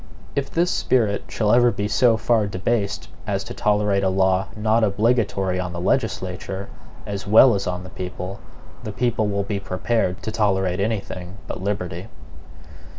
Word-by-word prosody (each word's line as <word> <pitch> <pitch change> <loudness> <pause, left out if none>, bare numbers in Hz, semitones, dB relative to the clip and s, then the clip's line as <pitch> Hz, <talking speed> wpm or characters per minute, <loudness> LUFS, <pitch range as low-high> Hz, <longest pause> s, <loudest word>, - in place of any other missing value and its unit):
If 140 -1 -1
this 175 +2 +1
spirit 110 -6 +1
shall 105 -2 0
ever 120 0 +6
be 105 -3 -2
so 115 +1 +3
far 110 -3 +2
debased 105 +2 -1 0.2
as 100 -1 -1
to - - -7
tolerate 105 -3 +1
a 95 - +3
law 95 0 +2
not 110 +1 +2
obligatory 100 -3 +1
on 90 -1 -3
the 85 - -4
legislature, 95 +2 -2 0.4
as 100 -1 -5
well 115 +4 +7
as 100 -1 -2
on 90 0 -3
the 90 - -10
people, 90 +1 -6 0.4
the 110 - -4
people 115 -1 0
will 100 -1 0
be 100 0 -3
prepared 95 0 -1
to 110 - -3
tolerate 95 -4 +1
any 105 +1 0
thing 90 0 -8
but - - -6
liberty. 95 -3 -3
100 Hz, 165 wpm, -22 LUFS, 95-110 Hz, 0.4 s, well